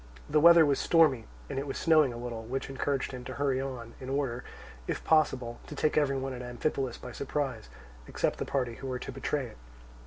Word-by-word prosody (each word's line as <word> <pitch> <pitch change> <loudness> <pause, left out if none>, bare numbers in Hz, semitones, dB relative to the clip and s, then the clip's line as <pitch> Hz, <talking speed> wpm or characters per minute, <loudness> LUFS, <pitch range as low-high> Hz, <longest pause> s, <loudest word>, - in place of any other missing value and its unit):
The 150 +1 +3
weather 170 +1 +8
was 140 -2 +2
stormy 150 -9 +4 0.2
and 135 -1 -3
it 140 - -4
was 135 - -4
snowing 155 -5 +4
a 120 - -7
little, 120 -1 -5
which 130 +4 -4
encouraged 135 0 -1
him 125 -1 -7
to - - -6
hurry 135 -2 +1
on, 125 -4 -6
in 130 - -7
order, 135 -3 -1 0.4
if - - -3
possible, 130 -7 +2
to 150 - -7
take 150 +2 +1
every 140 -3 +2
one 135 0 -3
at 125 - -6
Amphipolis 125 +1 -2
by 125 - -9
surprise, 135 - -3 0.4
except - - -1
the - - 0
party 125 -4 -1
who 135 - -7
were 130 -1 -2
to 125 - -6
betray 135 +1 -2
it. 115 - -12
135 Hz, 215 wpm, -30 LUFS, 125-145 Hz, 0.4 s, weather